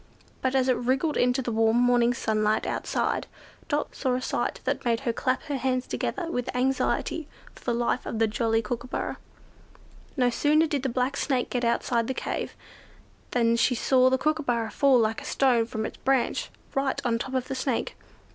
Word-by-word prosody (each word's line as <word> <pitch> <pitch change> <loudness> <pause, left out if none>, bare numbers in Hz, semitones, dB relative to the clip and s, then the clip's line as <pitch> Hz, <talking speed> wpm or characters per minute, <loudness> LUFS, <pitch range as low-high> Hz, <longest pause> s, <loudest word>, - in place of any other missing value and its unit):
But 260 0 0
as 260 -1 +3
it 255 -2 +3
wriggled 265 +5 0
into 250 +2 +2
the 240 - -2
warm 225 +1 +3
morning 245 -1 +4
sunlight 215 -2 +1
outside, - - -1 0.4
Dot 295 -1 -1
saw 255 -2 0
a 255 - -2
sight - - -1
that - - -1
made 235 -1 +1
her 240 -4 -1
clap 255 +2 -1
her 285 -2 -3
hands 255 -1 0
together 360 - -3
with 245 -4 -2
anxiety 265 +4 0 0.3
for - - -17
the 240 - +1
life 240 +1 0
of 225 - -3
the 225 - +4
jolly 225 +1 0
Kookooburra. 245 +3 -4 1.0
No 250 -2 +3
sooner 300 +6 +3
did 290 -4 -1
the 265 - -1
black 255 +3 0
Snake 260 -3 0
get 245 -1 -1
outside 235 0 +1
the 265 - -2
cave, - - -3 0.7
than 235 -1 +2
she 250 +2 +2
saw 255 +2 +4
the 260 - +2
Kookooburra 255 -7 0
fall 275 -2 +4
like 225 -1 +1
a - - -9
stone 245 -4 +2
from 220 -2 -3
its - - -6
branch, 265 -2 0 0.2
right 270 0 0
on 230 -1 +1
top 265 +2 -4
of 255 -1 -1
the 270 - -3
Snake. 260 -2 -2
250 Hz, 190 wpm, -26 LUFS, 235-265 Hz, 1.0 s, morning